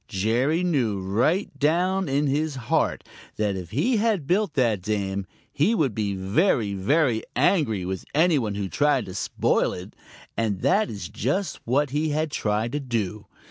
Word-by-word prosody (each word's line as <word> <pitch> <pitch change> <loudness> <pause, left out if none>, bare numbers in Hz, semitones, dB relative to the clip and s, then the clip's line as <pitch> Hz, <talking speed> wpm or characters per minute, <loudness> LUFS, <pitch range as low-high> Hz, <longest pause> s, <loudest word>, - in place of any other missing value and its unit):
Jerry 120 - +1
knew 125 - +1
right 120 - 0
down 180 +4 +1
in 140 +2 +1
his 145 +1 0
heart 125 -4 0 0.3
that 105 -2 0
if 90 -3 -6
he 175 - +1
had 210 -7 +1
built 185 +1 +1
that 115 -8 +2
dam, 100 -1 -2 0.3
he 190 +11 +2
would 140 - +1
be 100 -2 -2
very, 100 - +1
very 115 - +2
angry 125 - +2
with 95 0 -4
any 160 -1 +4
one 105 -5 -2
who 100 -1 -2
tried 145 +2 +1
to 95 - -8
spoil 90 - 0
it, 90 +1 -9 0.4
and 105 -5 -1
that 195 - +2
is 100 -5 -6
just 145 - -2
what 135 +3 +1
he 150 +2 0
had 155 +1 -1
tried 110 0 -1
to 145 - -2
do. 110 -6 -3
125 Hz, 170 wpm, -25 LUFS, 105-155 Hz, 0.4 s, any